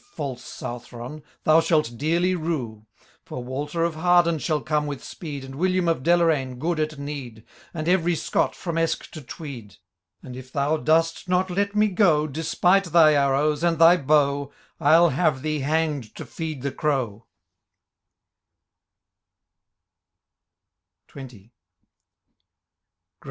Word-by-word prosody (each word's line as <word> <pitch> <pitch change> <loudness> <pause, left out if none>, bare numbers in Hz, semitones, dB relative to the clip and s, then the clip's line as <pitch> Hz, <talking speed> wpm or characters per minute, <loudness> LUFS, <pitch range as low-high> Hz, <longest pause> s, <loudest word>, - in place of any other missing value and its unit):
False 135 -5 -5
Southron, 120 +4 -8 0.2
thou 155 +1 +5
shalt 155 -7 +1
dearly 170 +7 +1
rue! 130 -11 -4 0.4
For 125 - -7
Walter 145 +6 -3
of 170 -1 0
Harden 170 0 +3
shall 155 0 0
come 150 -1 -1
with 140 -2 -6
speed. 145 -5 -7
And 135 - -10
William 185 +4 0
of 165 -5 +1
Deloraine, 160 -6 +2
good 165 +4 -2
at 155 -1 -2
need. 140 -6 -7 0.3
And 160 -2 -5
every 175 -1 +2
Scott, - - -1
from 170 -2 -3
Esk 165 0 -2
to 155 - -9
Tweed; 125 - -9 0.5
And, 125 - -9
if 130 0 -11
thou 145 +3 0
dost 165 +3 +1
not 185 +1 +1
let 200 +3 -1
me 210 0 +4
go. 175 -7 +3
Despite 170 +6 +1
thy 165 -2 +5
arrows, 145 +2 +1
and 170 -1 +2
thy 165 +2 +7
how, 140 -2 +1 0.3
I'll 165 +3 +5
have 135 -2 0
thee 155 -1 -1
hang'd 145 -5 -1
to - - -8
feed 155 -5 -6
the 140 - -2
crow 130 -7 -2
155 Hz, 130 wpm, -24 LUFS, 135-170 Hz, 0.5 s, thy